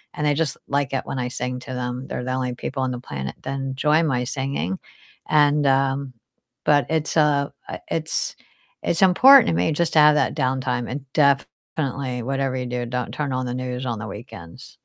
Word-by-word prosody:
and 150 0 -1
they 145 - +2
just 160 -2 -1
like 140 -1 -1
it 130 - -1
when 135 - -4
I 125 - -1
sing 125 +1 -3
to 130 0 -7
them, 125 +1 -4
they're 125 - -4
the 130 - -2
only 125 -1 -1
people 130 +2 -4
on 130 - -1
the 125 - -4
planet 65 - -5
that 135 +1 -3
enjoy 140 +4 +1
my 125 -5 0
singing 130 - -2 0.5
and, 150 -1 +4
um, 135 0 +1 0.5
but 145 -1 +4
it's, 160 0 0
uh 145 -2 +3 0.2
uh, - - -5
it's 160 0 -2 0.5
it's 170 - 0
important 255 +9 +8
to - - +1
me 90 - +1
just 170 +1 0
to 155 - +5
have 150 0 +7
that - - +1
downtime 130 -2 -1
and 135 +1 -5
definitely 140 -2 0
whatever 135 0 -1
you 125 - -3
do, 120 0 -3
don't 125 +1 -3
turn 145 -3 -2
on 130 0 -1
the 120 - -3
news 125 0 -4
on 115 - -2
the 105 - -6
weekends. 95 -6 -10
135 Hz, 200 wpm, -23 LUFS, 125-145 Hz, 0.5 s, important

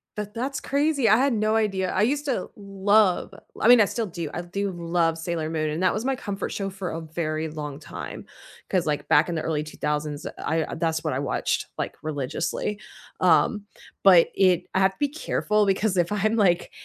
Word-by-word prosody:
That 210 -1 -5
that's 265 +4 -3
crazy, 280 -4 +1
I 215 - +6
had 270 0 +2
no 215 0 +1
idea, 195 -4 0
I 200 - +1
used 285 +5 +1
to 270 -4 -2
love 200 -1 +2 0.3
I - - +2
mean, 245 -2 +8
I - - +6
still 230 +2 -2
do, 170 -5 -5
I 175 - -3
do 195 +3 -3
love 170 -1 0
Sailor 165 -1 -3
Moon, 155 -1 -1
and 160 +5 -2
that 185 - +3
was 215 +4 -3
my 270 - +1
comfort 200 -5 -4
show 195 -1 -3
for 190 -2 -5
a 165 - -4
very 160 -1 -3
long 150 -2 -6
time, - - -8 0.4
'cause, 180 -4 +1
like, 150 -1 -2
back 150 - +5
in 175 - -3
the 160 - -1
early 155 -2 -1
2000s, 150 0 -3
I 160 +1 -1
uh, - - -6
that's 160 -1 -1
what - - -1
I 130 - -1
watched, 140 - -1
like, - - -3
religiously, 155 +7 -3 0.4
um, 210 -3 +3 0.4
but 180 -4 +7
it 180 -2 +3
I 190 - +2
have 190 0 +4
to - - -28
be 290 -1 +1
careful 215 -8 0
because 195 0 +1
if 175 +2 +1
I'm, 215 +2 +1
like 180 -4 +2
190 Hz, 210 wpm, -25 LUFS, 160-215 Hz, 0.4 s, mean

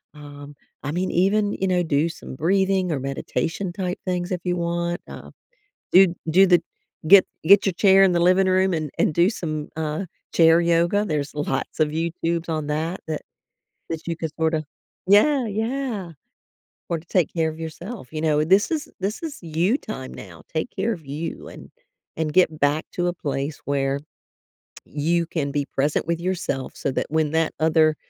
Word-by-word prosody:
um, 145 0 -11 0.3
I 145 - -3
mean, 180 +4 -1
even, 205 +3 +2
you 190 - -1
know, 180 -1 +2
do 155 0 +1
some 160 - -9
breathing 190 +3 +1
or 145 - -1
meditation 165 +7 -3
type 185 0 -3
things 180 -1 -2
if 180 - -2
you 180 0 0
want, 170 0 -2
um, - - -10 0.6
do 185 -1 +6 0.2
do 190 +4 +6
the 175 -2 +4 0.5
get 195 +1 +8 0.2
get 200 +5 +6
your 195 - +2
chair 195 +1 +6
in 185 - +4
the 170 - +2
living 185 +2 +4
room 185 0 +3
and 155 -3 -2
and - - +2
do 170 +4 +4
some, 155 -8 -4
uh, 160 +4 -2 0.3
chair 165 0 +6
yoga. 170 +4 +2
There's 150 -5 -2
lots 150 +2 -3
of 155 - +4
YouTubes 165 +1 -2
on 155 -2 -2
that 160 +4 -2
that 155 -1 -3 0.7
that 165 0 -5
you 165 - -1
could 160 -2 -4
sorta 160 -1 +1 0.4
yeah. 245 +6 +5
Yeah, 220 -3 -3 0.8
or 170 - 0
to 165 - -15
take 180 -5 +1
care 160 -1 +1
of 155 - -10
yourself, 165 - -8
you 155 - -3
know? 155 -1 +2
This 195 - +3
is 310 -2 -1
this 200 - -3
is 315 -4 -5
you-time 170 - -2
now, 85 -5 -11
take 160 +10 -1
care 210 +4 0
of 160 -5 -13
you 150 +4 -5
and - - -12 0.5
and 155 -2 -1
get 160 -4 +3
back 145 +2 +2
to 175 0 -1
a 175 - -2
place 145 -2 -3
where 140 0 0 0.9
you 165 +4 0
can 145 -4 -2
be 145 -1 -1
present 145 +2 -1
with 170 -1 0
yourself 170 -7 -3
so - - -2
that - - -2
when 155 -1 +1
that 160 0 +1
other 155 -1 +3
170 Hz, 180 wpm, -23 LUFS, 155-185 Hz, 0.9 s, get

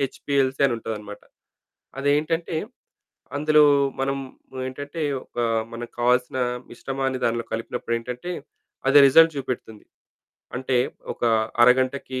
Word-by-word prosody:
HPLC 135 0 0
అని 120 - 0
ఉంటదన్నమాట. 105 -2 -7 0.8
అదేంటంటే 155 +4 0 0.8
అందులో 150 0 +5 0.4
మనం 135 +1 0 0.5
ఏంటంటే 145 +4 -6 0.2
ఒక 120 - -8 0.3
మనకు 120 0 -7
కావాల్సిన 125 +1 +2 0.3
మిశ్రమాన్ని 135 +1 -3
దానిలో 115 0 0
కలిపినప్పుడు 115 +1 -3
ఏంటంటే 125 +7 -6 0.6
అది 145 +2 +7
రిజల్ట్ 165 +3 +6
చూపెడుతుంది. 125 -5 -5 0.7
అంటే 130 0 -1 0.4
ఒక - - -4 0.4
అరగంటకి 130 +1 +2
130 Hz, 100 wpm, -24 LUFS, 120-145 Hz, 0.8 s, అది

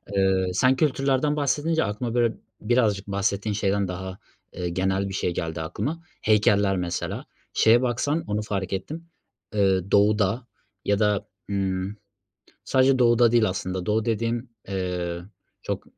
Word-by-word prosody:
Eee, 95 -1 +2
sen 130 +6 +4
kültürlerden 135 0 +1
bahsedince 150 +3 +1
aklıma 110 +3 -3
böyle 120 -2 +2 0.3
birazcık 105 -4 +1
bahsettiğin 100 +1 -1
şeyden 100 -1 0
daha, 95 +1 -6 0.4
eee, 90 -1 -3
genel 95 +2 0
bir - - -6
şey 90 -2 -1
geldi 80 -1 -3
aklıma; 130 - -3 0.2
heykeller 100 -2 +3
mesela. 90 -1 -3 0.3
Şeye 115 +2 +5
baksan 130 +6 0
onu 105 +1 -1
fark 100 -3 -3
ettim, 155 - -5 0.5
eee, 95 -2 +2
Doğu'da 105 +3 +3 0.4
ya 100 0 +2
da, 105 -2 +1 0.2
ımm, 95 0 -2 0.7
sadece 130 0 +3
Doğu'da 120 -1 +5
değil 115 -3 +4
aslında 95 -1 -3
Doğu 110 +1 +1
dediğim, 115 +1 -1 0.2
eee, 90 -3 -3 0.4
çok - - -4
105 Hz, 135 wpm, -25 LUFS, 95-120 Hz, 0.7 s, Şeye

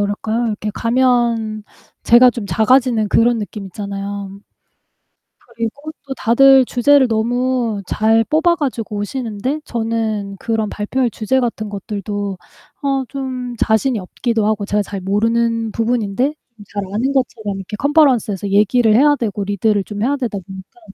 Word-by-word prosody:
그럴까요? 215 +3 -1
이렇게 210 0 -3
가면 230 -3 +1 0.4
제가 245 +2 +7
좀 230 -4 -6
작아지는 230 -1 +2
그런 230 +2 +3
느낌 205 -1 -6
있잖아요. 200 0 -6 1.3
그리고 275 +7 -4 0.2
또 270 - -3
다들 265 +3 +5
주제를 265 +2 +4
너무 235 -1 0
잘 225 +1 +2
뽑아 320 +5 +2
가지고 235 -9 -3
오시는데 240 +5 -3
저는 220 -3 -2
그런 220 -2 -1
발표할 240 +5 -1
주제 230 +6 0
같은 230 -4 -2
것들도 205 -1 -4 0.5
어 275 -1 0
좀 255 -3 -5
자신이 220 +4 +1
없기도 220 +3 -2
하고 215 -2 0
제가 205 0 0
잘 200 0 -6
모르는 225 +3 0
부분인데 230 +3 0 0.2
좀 205 - -13
잘 200 - -2
아는 260 +6 0
것처럼 230 -6 -1
이렇게 195 +2 -6
컨퍼런스에서 255 - +2
얘기를 215 +3 +3
해야 290 +3 +5
되고 210 -4 -2
리드를 205 0 +1
좀 205 -1 -6
해야 280 +4 +1
되다 230 -7 -3
보니까 190 - -12
225 Hz, 325 characters per minute, -18 LUFS, 205-250 Hz, 1.3 s, 제가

